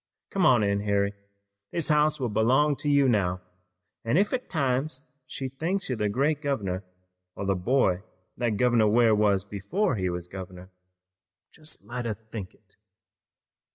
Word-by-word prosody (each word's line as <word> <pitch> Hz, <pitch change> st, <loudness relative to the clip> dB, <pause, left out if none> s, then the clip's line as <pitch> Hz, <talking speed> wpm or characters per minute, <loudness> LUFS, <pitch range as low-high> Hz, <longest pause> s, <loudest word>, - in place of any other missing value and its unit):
Come 190 Hz, -5 st, +3 dB
on 120 Hz, -6 st, +5 dB
in, 100 Hz, 0 st, +1 dB
Harry, 100 Hz, 0 st, +1 dB, 0.6 s
this 170 Hz, -3 st, -1 dB
house 150 Hz, 0 st, +3 dB
will 125 Hz, -3 st, -1 dB
belong 130 Hz, +8 st, +3 dB
to 145 Hz, +2 st, -2 dB
you 140 Hz, -1 st, +4 dB
now, 95 Hz, -6 st, +1 dB, 0.6 s
an' 115 Hz, +7 st, +1 dB
ef 205 Hz, +5 st, +2 dB
at 255 Hz, 0 st, -3 dB
times 135 Hz, -2 st, -1 dB, 0.2 s
she 135 Hz, -, -4 dB
thinks 165 Hz, +9 st, -2 dB
you're 130 Hz, -, 0 dB
the 105 Hz, -2 st, 0 dB
great 140 Hz, +7 st, +1 dB
governor, 100 Hz, -10 st, -2 dB, 0.5 s
or 100 Hz, -, -4 dB
the 100 Hz, -, +2 dB
boy 95 Hz, -1 st, +1 dB, 0.3 s
that 120 Hz, -4 st, -1 dB
Governor 120 Hz, -2 st, +4 dB
Ware 115 Hz, +1 st, +4 dB
was 105 Hz, -2 st, +3 dB
before 105 Hz, -, -1 dB
he 95 Hz, -2 st, 0 dB
was 90 Hz, 0 st, -4 dB
governor, 95 Hz, 0 st, -9 dB, 0.8 s
jest 155 Hz, -1 st, -7 dB
let 120 Hz, 0 st, -5 dB
her 110 Hz, -2 st, -1 dB
think 110 Hz, -3 st, -9 dB
it." -, -, -20 dB
120 Hz, 160 wpm, -27 LUFS, 100-140 Hz, 0.8 s, on